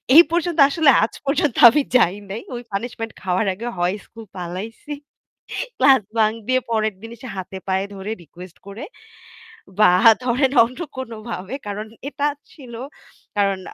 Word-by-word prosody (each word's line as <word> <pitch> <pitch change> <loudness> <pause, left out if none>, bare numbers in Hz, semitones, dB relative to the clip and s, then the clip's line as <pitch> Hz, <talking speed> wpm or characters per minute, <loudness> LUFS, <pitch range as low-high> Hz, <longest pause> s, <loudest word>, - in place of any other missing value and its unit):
এই 335 - +11
পর্যন্ত 345 -1 0
আসলে 310 -1 +3
আজ 220 - -1
পর্যন্ত 290 -2 +1
আমি 295 +4 +2
যাই 195 -6 +4
নাই। 215 +4 -5
ওই 240 - -5
পানিশমেন্ট 225 +2 -4
খাওয়ার 185 +3 0
আগে 230 +6 -6
হয় 175 +3 +1
স্কুল 225 -1 -12
পালাইছি। 185 +10 -7 0.9
ক্লাস 265 -4 +6 0.2
বাঙ্ক 220 0 +3
দিয়ে 255 0 +2
পরের 215 -2 +1
দিন 225 +1 -9
এসে 255 +3 -11
হাতে 190 +1 -6
পায়ে 190 +1 0
ধরে 195 +3 -5
রিকোয়েস্ট 175 +3 -13
করে 210 +8 -8 1.0
বা 210 -4 +7 0.3
ধরেন 255 +2 +2
অন্য 250 +7 -5 0.2
কোনোভাবে 225 -3 -6
কারণ 205 +1 -4 0.2
এটা 290 0 -1 0.3
ছিল 255 -5 -12 0.6
কারণ 195 -2 +2
225 Hz, 150 wpm, -21 LUFS, 195-255 Hz, 1.0 s, এই